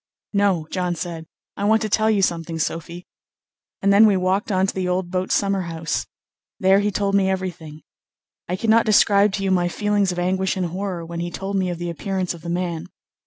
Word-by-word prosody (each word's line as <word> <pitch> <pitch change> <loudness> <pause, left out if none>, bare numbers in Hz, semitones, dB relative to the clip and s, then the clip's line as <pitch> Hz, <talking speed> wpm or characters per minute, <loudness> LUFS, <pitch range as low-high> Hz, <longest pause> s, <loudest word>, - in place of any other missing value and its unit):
"No," 200 -5 +2
John 180 -2 -1
said, 165 -2 -6 0.3
"I 200 - -5
want 220 +1 +3
to - - 0
tell 215 +1 +2
you 205 -3 +2
something, 165 -2 -1
Sophy," 165 +2 -4 0.8
and 200 0 +4
then 215 +2 +7
we 200 -2 +3
walked 190 +4 0
on 190 0 +2
to 195 - -2
the 185 -1 -2
old 180 0 -1
boat 185 0 -2
summer 195 -1 +1
house. 165 -2 -3 0.5
There 190 +1 +5
he 205 +1 +1
told 200 0 -1
me 195 -1 +3
everything. 175 -5 -4 0.7
I 180 - 0
cannot 225 +3 +3
describe 205 -1 +5
to 195 - -2
you 190 - +1
my 175 -1 +2
feelings 205 +1 0
of 180 - -6
anguish 185 +2 0
and 185 - 0
horror 180 0 -4
when 170 0 -6
he 175 0 -3
told 195 +3 -5
me 185 -2 +1
of 175 - -3
the 175 0 -4
appearance 185 +3 -2
of 170 - -12
the 170 - -7
man. 175 -1 -2
185 Hz, 215 wpm, -22 LUFS, 175-200 Hz, 0.8 s, then